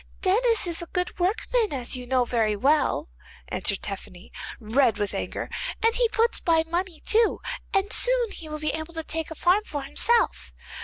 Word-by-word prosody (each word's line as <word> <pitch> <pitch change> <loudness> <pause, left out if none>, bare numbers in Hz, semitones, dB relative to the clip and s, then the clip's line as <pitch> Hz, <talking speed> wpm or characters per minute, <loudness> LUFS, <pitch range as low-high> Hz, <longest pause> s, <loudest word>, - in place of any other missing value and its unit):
'Denis 450 +4 +3
is 340 -1 0
a 340 - -4
good 360 +1 -2
workman, 445 +4 +1
as 255 -4 -3
you 250 -1 -7
know 255 -1 +2
very 225 -3 +1
well,' 285 +8 +2 0.4
answered 195 - 0
Tephany, 190 -1 -7 0.3
red 230 0 +2
with 205 -1 -2
anger, - - -4 0.4
'and 455 0 +4
he 475 -1 +2
puts 460 +1 +1
by 325 -1 +3
money 340 0 -3
too, 450 +1 +3 0.3
and 390 +1 +1
soon - - +4
he 320 -5 -8
will 305 - -4
be 305 0 -1
able 315 +1 -6
to 325 - -1
take 320 0 -3
a 320 - -7
farm 360 +6 +3
for 290 -8 -5
himself. 455 +12 +1
325 Hz, 185 wpm, -25 LUFS, 265-425 Hz, 0.4 s, and